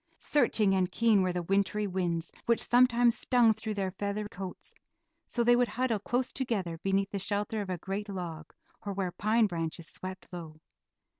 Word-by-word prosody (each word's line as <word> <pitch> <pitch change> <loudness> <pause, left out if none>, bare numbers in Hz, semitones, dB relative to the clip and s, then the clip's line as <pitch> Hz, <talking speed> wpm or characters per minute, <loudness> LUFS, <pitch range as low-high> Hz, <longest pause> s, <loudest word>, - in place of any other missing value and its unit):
Searching 225 -8 +2
and 185 -1 +1
keen 225 -4 +4
were 185 -1 +1
the 175 0 -2
wintry 200 +3 +1
winds, 175 -3 -1 0.2
which 235 -1 +3
sometimes 245 -1 +5
stung 240 -3 +4
through 220 0 -5
their 190 -2 -1
feather 205 +2 -3
coats, 190 -2 -6 0.5
so 240 - 0
they 240 +1 +6
would 245 0 +3
huddle 245 -4 0
close 245 +5 -1
together 195 -11 -2
beneath 195 +1 0
the 200 - -2
shelter 205 +2 -1
of 200 - -6
a 180 - -1
great 195 +4 -4
log, 170 -5 -6 0.3
or 200 - -3
where 190 -2 -2
pine 220 +4 +2
branches 165 -3 -3
swept 185 0 -8
low. 160 -3 -8
200 Hz, 175 wpm, -30 LUFS, 185-225 Hz, 0.5 s, they